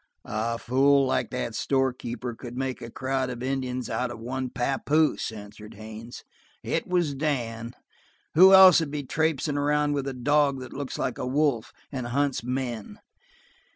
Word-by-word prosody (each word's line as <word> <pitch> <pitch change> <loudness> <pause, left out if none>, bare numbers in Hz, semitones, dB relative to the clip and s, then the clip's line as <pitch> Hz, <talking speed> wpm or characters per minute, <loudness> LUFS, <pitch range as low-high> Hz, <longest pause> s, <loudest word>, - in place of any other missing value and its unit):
"A 115 +2 -2
fool 135 +4 +3
like 130 - 0
that 125 -2 -3
store 130 +3 +1
keeper 120 0 -5
could 120 +1 -9
make 130 -1 -3
a 115 - -7
crowd 130 +1 -2
of 125 -1 -6
Indians 130 -1 -2
out 125 0 -2
of 120 -2 -8
one 130 +2 -4
papoose," 140 +4 0
answered 105 0 -11
Haines. 110 +3 -9 0.4
"It - - -2
was 175 -5 +1
Dan. 120 -5 -3 0.6
Who 185 +4 +8
else 190 -3 +9
would 160 -3 -2
be 145 0 -4
traipsing 150 0 0
around 150 0 +1
with 140 -1 -2
a 135 - -3
dog 140 +2 +2
that 130 - -9
looks 140 -1 -5
like 130 - -2
a 125 - -3
wolf 135 -4 0 0.2
and 130 -4 -4
hunts 140 +1 0
men?" 125 -3 -4
130 Hz, 165 wpm, -26 LUFS, 120-145 Hz, 0.6 s, else